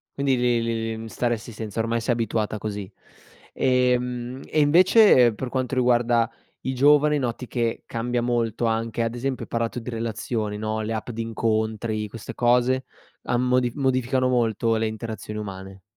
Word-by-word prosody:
Quindi 140 -2 +1
li 120 -1 +2
li 115 0 -1 0.2
li 110 - -4
mhmm, 115 - -7
stareresti 120 +2 -2
senza, 110 0 -5
ormai 115 +1 0
sei 120 - +1
abituata 110 -2 -1
così. 105 -2 -5 0.6
Ehm, 125 0 0
e 155 - -1
invece, 160 - +6
per 130 +4 -5
quanto 130 0 -2
riguarda 120 -2 +3 0.3
i 130 - -2
giovani, 150 +3 +5
noti 125 -2 -3
che 115 -2 -2
cambia 120 +1 -2
molto 120 -1 0
anche, 115 0 -1
ad 115 +1 -2
esempio, 130 +1 -3
hai - - -28
parlato 115 +1 -2
di 120 - -7
relazioni 115 -2 -3
no, 110 +1 -2
le 110 +1 -3
app 110 +2 -4
di 115 0 -4
incontri, 110 -1 -1
queste 115 -1 -8
cose, 125 +2 +2 0.4
han 120 - 0
modi 125 -1 +2
modificano 130 -1 +1
molto 115 -2 +1
le 110 0 0
interazioni 110 -1 -6
umane? 95 -1 -8
115 Hz, 165 wpm, -24 LUFS, 110-125 Hz, 0.6 s, invece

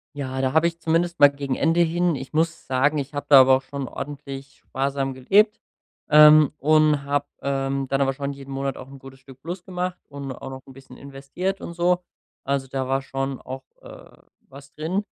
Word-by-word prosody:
Ja, 130 -2 -4
da 130 0 0
habe 160 +1 +4
ich 170 0 -5
zumindest 170 +1 0
mal 145 - +9
gegen 140 -2 -4
Ende 165 +1 +2
hin 170 0 +1
ich 135 +1 -8
muss 160 +1 -1
sagen, 135 +4 +1
ich 140 0 -4
habe 145 0 -5
da 140 -2 +9
aber 130 0 +5
auch - - -9
schon 135 0 -6
ordentlich 140 -1 -8
sparsam 135 0 -3
gelebt, 200 - +3 0.5
ähm, 150 0 +7
und 155 0 +3
habe, 145 0 -1 0.2
ähm, 135 0 -1
dann 135 +1 0
aber 135 0 +1
schon 140 +1 -4
jeden 135 0 -11
Monat 135 0 -3
auch 130 - -10
'n 135 0 -12
gutes 135 0 -14
Stück 135 -1 -16
Plus 175 +3 -6
gemacht 180 0 -4
und 140 -1 -7
auch 130 +1 -8
noch 130 0 -9
'n 135 - -14
bisschen 130 -1 -15
investiert 140 +8 -5
und 170 - -7
so. 175 +1 +1 0.4
Also, 140 -1 -2
da 130 0 -3
war 135 +1 0
schon 135 0 -4
auch, 130 +1 -8 0.2
äh, - - -14 0.3
was 140 +1 -14
drin. 180 +7 -3
140 Hz, 205 wpm, -23 LUFS, 135-155 Hz, 0.5 s, mal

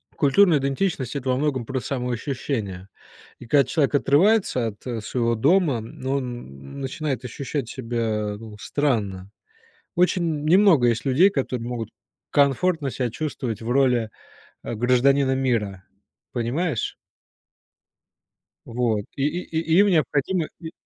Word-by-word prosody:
культурная 155 +2 +4
идентичность- 135 -1 -1
это 135 -2 -3
во 125 - +2
многом 135 -5 -1
про 130 +1 -2
самоощущение. 120 -6 -3 0.5
И - - -10
когда 140 +1 +5
человек 145 +1 0
отрывается 150 - +3
от, 105 -2 -9
э, 120 -3 -3
своего 115 +1 0
дома, 145 - +3
ну 130 +4 -6
он 125 -3 -4
н 70 - -11
начинает 135 -2 -3
ощущать 135 +1 -4
себя, 115 -5 -2
ну, 110 -1 -10
странно. 105 -11 -1 0.6
Очень 180 0 +2 0.2
н - - -6
немного 170 -7 +5
есть 115 +3 0
людей, 145 +9 +5
которые 130 - -3
могут 120 -3 -4 0.4
комфортно 145 +1 +2
себя 125 0 -2
чувствовать 120 -4 -4
в 115 - -5
роли, 125 -4 +2 0.5
э, - - -4
гражданина 130 +3 +3
мира. 105 -8 -1 0.5
Понимаешь? 125 +3 -2 1.7
Вот. 115 -3 -1
И 135 - -2
и 165 +1 -3
и 165 +2 +2
им 205 - +6
необходимо 160 0 +1
и 160 -2 -7
130 Hz, 130 wpm, -23 LUFS, 115-150 Hz, 1.7 s, им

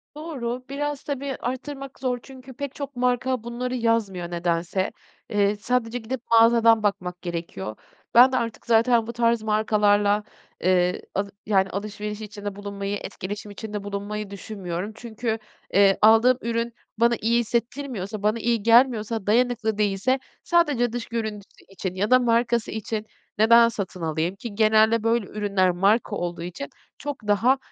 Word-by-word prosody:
Doğru. 255 -6 -4
Biraz 290 +1 -3
tabii, 280 -1 -3
arttırmak 270 +2 -5
zor 250 -2 -1
çünkü 260 -1 -12
pek 280 +1 -6
çok 280 -2 -6
marka 250 0 0
bunları 245 +2 -3
yazmıyor 215 -7 0
nedense. 175 +2 -1 0.4
Eee, 205 -1 +2
sadece 235 +2 -1
gidip 235 +1 -5
mağazadan 230 -1 +6
bakmak 180 -3 -2
gerekiyor. 165 - -5 0.4
Ben 250 +2 +8
de 255 - +1
artık 230 -1 -4
zaten 230 0 +3
bu 235 - -5
tarz 235 -1 +1
markalarla, 210 -1 +2 0.4
eee, 180 0 +2
al 200 +1 -1 0.2
yani, 195 -2 +2
alışveriş 210 +2 -5
içinde 205 -1 -6
bulunmayı, 200 0 -4
etkileşim 205 +2 -6
içinde 210 0 -6
bulunmayı 205 +1 -4
düşünmüyorum. 195 -1 -5
Çünkü, 225 -1 -4 0.3
eee, 195 0 +5
aldığım 225 +4 +6
ürün 230 0 -2 0.2
bana 235 +1 +4
iyi 235 +2 +3
hissettirmiyorsa, 235 -3 -3
bana 215 +2 +2
iyi 230 -2 0
gelmiyorsa, 230 -3 +3
dayanıklı 230 -1 +2
değilse 210 +6 +1 0.2
sadece 290 -9 +2
dış 240 -1 -3
görüntüsü 220 -3 -5
için 190 -1 -5
ya 205 +5 -1
da 255 - +7
markası 235 -1 +1
için 220 0 -4 0.3
neden 230 +2 +6
satın 195 -5 -5
alayım? 165 +3 -1
Ki 205 +1 -8
genelde 220 +1 +4
böyle 230 -1 +2
ürünler 200 -3 +1
marka 205 +4 +2
olduğu 175 -2 -4
için 170 -5 -6 0.3
çok 275 -6 -6
daha, 230 +6 +4
220 Hz, 145 wpm, -24 LUFS, 200-240 Hz, 0.4 s, Ben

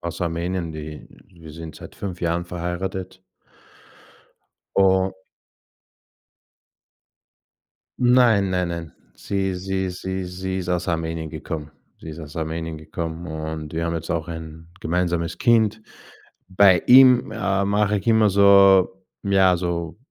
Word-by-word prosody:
aus 85 0 -6
Armenien. 85 0 -2
Die 75 -1 -8 0.2
wir 85 -4 -14
sind 80 0 -9
seit - - -12
5 95 -3 -6
Jahren 85 0 -1
verheiratet. 90 +2 -5 1.5
U 95 -1 +3 2.9
Nein, 120 -6 +4
nein, 90 -1 0
nein. 85 -2 -6 0.2
Sie 95 -1 -2
sie 95 0 -2
sie 95 +1 -4
sie 95 +1 -4
ist 90 -1 -5
aus 90 0 -1
Armenien 80 -1 -2
gekommen. 80 -1 -6 0.3
Sie - - -10
ist 80 +1 -8
aus 75 -1 -10
Armenien 80 0 -4
gekommen 80 +2 -6
und 80 -1 -6
wir 80 +1 -2
haben 85 0 -2
jetzt 80 - -5
auch 85 -1 -2
ein 80 -1 -8
gemeinsames 85 -1 -1
Kind. 110 -2 +3 0.7
Bei 95 -2 +5
ihm, 125 -2 +7
äh, 100 -2 0
mache 105 +1 +1
ich 100 - -10
immer 110 -2 +4
so 100 -1 +6 0.3
ja, 95 -2 +3
so 85 -2 -3
90 Hz, 130 wpm, -22 LUFS, 80-95 Hz, 2.9 s, ihm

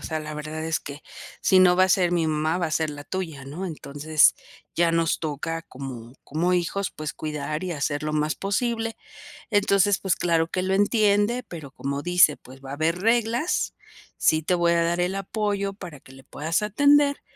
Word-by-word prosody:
sea, 160 - -3
la 155 0 -6
verdad 155 +1 -5
es 160 0 -1
que, 145 +1 -9 0.4
si 190 - +5
no 180 -1 +6
va 185 - +6
a - - 0
ser 180 -2 +3
mi 170 -2 +1
mamá, 155 +1 0
va 180 - -1
a - - -9
ser 160 0 0
la 145 -1 -7
tuya", 160 -6 -5
¿no? 155 +8 -6
Entonces 155 -1 +2 0.4
ya 170 0 +3
nos 165 -1 +1
toca, 160 +1 -3
como 130 -5 -9
como 170 +5 0
hijos, 180 +2 -1
pues 155 -1 -6
cuidar 150 +2 -4
y 180 - -3
hacer 145 -1 -2
lo 155 0 -2
más 155 0 0
posible. 225 +3 -2 0.5
Entonces, 205 -2 +3
pues 190 - 0
claro 165 -2 +1
que 185 - -2
lo 190 +1 0
entiende, 205 +3 +2
pero 160 - -9
como 140 +1 -4
dice: 175 -3 +4
"Pues, 130 +1 -15
va 135 0 -8
a - - -3
haber 165 +4 0
reglas. 235 - +1 0.4
Sí 155 0 +3
te 180 - +1
voy 170 -1 +2
a 170 - +2
dar 170 +1 0
el 180 +2 0
apoyo 200 0 -2
para 175 -7 -10
que 130 - -17
le 135 +1 -15
puedas 160 +5 -2
atender, 285 +6 +3
170 Hz, 200 wpm, -24 LUFS, 150-195 Hz, 0.5 s, no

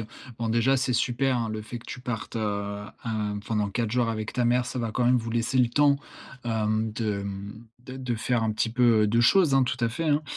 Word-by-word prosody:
Heu, 110 - -6 0.3
bon 115 -1 -2
déjà, 120 +4 +3
c'est 130 0 0
super, 125 +2 +1
hein, 115 -2 -1
le 110 0 -4
fait 120 +3 -7
que - - -17
tu 130 - -7
partes, 120 -2 -5
heu, 100 -1 -2 0.2
hem, 105 -2 -2
pendant 105 -2 0
4 110 +1 -2
jours 120 -1 +1
avec 110 -1 -3
ta 125 - 0
mère. 125 +1 +3
Ça 125 +1 -5
va 115 -2 -2
quand 125 - 0
même 125 +1 +5
vous 115 -1 -3
laisser 120 +2 0
le 120 -2 +4
temps, 140 +3 +4 0.5
hem, 110 -1 0
de 105 -3 -2 0.6
de 130 +1 -9
de 125 -2 -2
faire 115 0 0
un 110 - 0
petit 110 +1 0
peu, 120 -3 +4
heu, - - +4
de 115 +2 +3
choses, 155 +3 +5
hein, 135 - +5
tout 125 - -2
à - - +2
fait, 165 +8 -4
hein. 150 0 +2
115 Hz, 250 wpm, -26 LUFS, 110-125 Hz, 0.6 s, même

